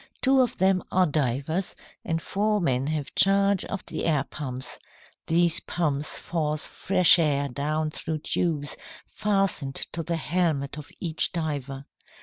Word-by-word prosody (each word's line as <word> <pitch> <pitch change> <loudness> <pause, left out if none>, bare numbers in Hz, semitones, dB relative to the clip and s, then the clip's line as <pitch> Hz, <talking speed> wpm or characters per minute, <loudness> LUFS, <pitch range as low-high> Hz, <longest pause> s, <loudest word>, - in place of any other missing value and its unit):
Two 265 0 +4
of 245 - 0
them 190 0 +2
are 185 0 +4
divers, 150 +4 -1 0.3
and 165 0 -1
four 210 +2 0
men 135 -6 0
have 150 -2 -3
charge 195 0 +4
of 200 - -5
the - - -4
air 150 -4 +2
pumps. 130 -3 -5 0.5
These 170 0 +3
pumps 150 -3 -2
force 155 -3 -2
fresh 185 -2 +4
air 145 -3 +2
down 155 +4 -2
through 155 0 -4
tubes 150 -5 -1 0.3
fastened 195 -9 -1
to 165 - -2
the 170 +1 -2
helmet 155 -4 0
of 145 - -10
each 165 -2 +2
diver. 140 -5 -3
160 Hz, 140 wpm, -26 LUFS, 145-180 Hz, 0.5 s, Two